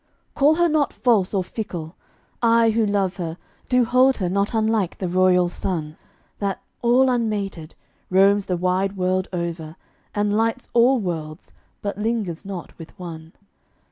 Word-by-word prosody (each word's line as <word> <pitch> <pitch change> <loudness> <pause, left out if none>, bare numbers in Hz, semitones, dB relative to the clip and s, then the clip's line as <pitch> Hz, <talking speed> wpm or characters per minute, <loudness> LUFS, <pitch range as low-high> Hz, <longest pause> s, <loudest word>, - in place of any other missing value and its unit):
Call 295 +2 +4
her 345 +1 +3
not 305 -3 +1
false 220 -7 +2
or 195 -3 0
fickle. 180 -5 -6 0.5
I, 230 -1 +4
who 220 -1 +1
love 195 -3 0
her, 170 -2 -4 0.3
Do 250 -2 +4
hold 255 +3 +4
her 185 -4 -1
not 200 +4 0
unlike 220 -4 +1
the 185 - -3
royal 180 0 +3
sun, 165 -3 -4 0.4
That, 200 -2 -2 0.2
all 245 +2 +4
unmated, 205 -9 -2 0.3
roams 195 +2 +4
the 180 - 0
wide 185 +2 0
world 185 0 0
over 170 -3 -4 0.4
And 205 0 +1
lights 230 +3 0
all 245 +2 +4
worlds, 160 -6 -5 0.3
but 205 0 -3
lingers 210 -6 -2
not 195 -3 -7
with 165 +3 -12
one. 165 -3 -9
195 Hz, 150 wpm, -22 LUFS, 180-230 Hz, 0.5 s, Call